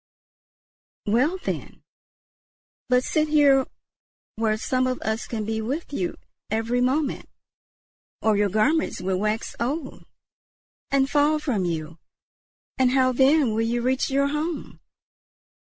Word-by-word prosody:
"Well, 255 Hz, -, +2 dB
then; 375 Hz, -, -6 dB, 1.1 s
but 250 Hz, 0 st, +3 dB
sit 310 Hz, +3 st, +1 dB
here 285 Hz, -3 st, +4 dB, 0.7 s
where 220 Hz, -1 st, 0 dB
some 255 Hz, +3 st, 0 dB
of 255 Hz, 0 st, -2 dB
us 220 Hz, +1 st, -2 dB
can 220 Hz, -3 st, -3 dB
be 220 Hz, +1 st, -2 dB
with 280 Hz, +8 st, -4 dB
you 180 Hz, -9 st, -2 dB, 0.3 s
every 225 Hz, +3 st, 0 dB
moment, 275 Hz, +3 st, 0 dB, 0.9 s
or 220 Hz, -1 st, +2 dB
your 205 Hz, 0 st, +2 dB
garments 260 Hz, -, +1 dB
will 185 Hz, 0 st, -1 dB
wax 215 Hz, +2 st, -2 dB
old 265 Hz, +4 st, -3 dB, 0.9 s
and 275 Hz, -1 st, +2 dB
fall 295 Hz, +2 st, +3 dB
from 245 Hz, -11 st, -1 dB
you, 165 Hz, -1 st, -4 dB, 0.8 s
and 260 Hz, -1 st, +4 dB
how 260 Hz, 0 st, +3 dB
then 265 Hz, -1 st, +3 dB
will 220 Hz, -, 0 dB
you 235 Hz, +1 st, 0 dB
reach 260 Hz, +1 st, +1 dB
your 280 Hz, +1 st, +2 dB
home?" 305 Hz, +3 st, -4 dB
255 Hz, 125 wpm, -24 LUFS, 220-280 Hz, 1.1 s, here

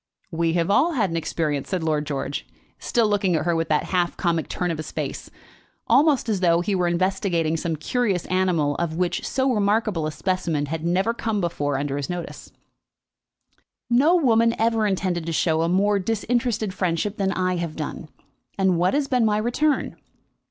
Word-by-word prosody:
"We 165 Hz, 0 st, 0 dB
have 170 Hz, +2 st, +1 dB
all 310 Hz, +10 st, +3 dB
had 210 Hz, -, 0 dB
an -, -, -3 dB
experience," 155 Hz, -3 st, -2 dB
said 185 Hz, -4 st, -2 dB
Lord 150 Hz, -2 st, 0 dB
George, 140 Hz, -1 st, -4 dB, 0.3 s
still 230 Hz, -2 st, +1 dB
looking 200 Hz, -4 st, +1 dB
at 155 Hz, 0 st, -1 dB
her 170 Hz, -1 st, +1 dB
with 165 Hz, 0 st, -1 dB
that 150 Hz, -1 st, +2 dB
half 175 Hz, -1 st, +1 dB
comic 170 Hz, -3 st, 0 dB
turn 180 Hz, -1 st, -2 dB
of 160 Hz, -, -4 dB
his 155 Hz, -, -6 dB
face, -, -, -5 dB, 0.6 s
almost 275 Hz, +2 st, +3 dB
as 210 Hz, -4 st, 0 dB
though 170 Hz, -2 st, +3 dB
he 200 Hz, +3 st, -1 dB
were 180 Hz, -2 st, +1 dB
investigating 175 Hz, -2 st, 0 dB
some 165 Hz, 0 st, -2 dB
curious 195 Hz, -, -1 dB
animal 180 Hz, -6 st, +1 dB
of 170 Hz, -2 st, -2 dB
which 180 Hz, 0 st, -1 dB
so 260 Hz, 0 st, +1 dB
remarkable 205 Hz, -5 st, +1 dB
a -, -, -3 dB
specimen 170 Hz, -3 st, -1 dB
had 160 Hz, +2 st, -4 dB
never 185 Hz, +7 st, +1 dB
before 175 Hz, -11 st, -2 dB
come -, -, 0 dB
under 140 Hz, 0 st, -2 dB
his 140 Hz, -1 st, -4 dB
notice. 175 Hz, -1 st, -6 dB, 1.4 s
"No 290 Hz, +9 st, +5 dB
woman 230 Hz, -7 st, +3 dB
ever 225 Hz, -1 st, +2 dB
intended 180 Hz, -4 st, -1 dB
to -, -, -1 dB
show 160 Hz, 0 st, +1 dB
a 165 Hz, -, +1 dB
more 200 Hz, +3 st, +2 dB
disinterested 225 Hz, 0 st, -1 dB
friendship 185 Hz, +3 st, -1 dB
than 195 Hz, -1 st, 0 dB
I 185 Hz, -1 st, 0 dB
have 170 Hz, -2 st, -4 dB
done; 155 Hz, 0 st, -6 dB, 0.5 s
and 190 Hz, -3 st, +2 dB
what 180 Hz, +6 st, +2 dB
has 285 Hz, -1 st, +1 dB
been 250 Hz, -3 st, +2 dB
my 210 Hz, -1 st, +2 dB
return?" 250 Hz, +7 st, 0 dB
185 Hz, 185 wpm, -23 LUFS, 165-215 Hz, 1.4 s, No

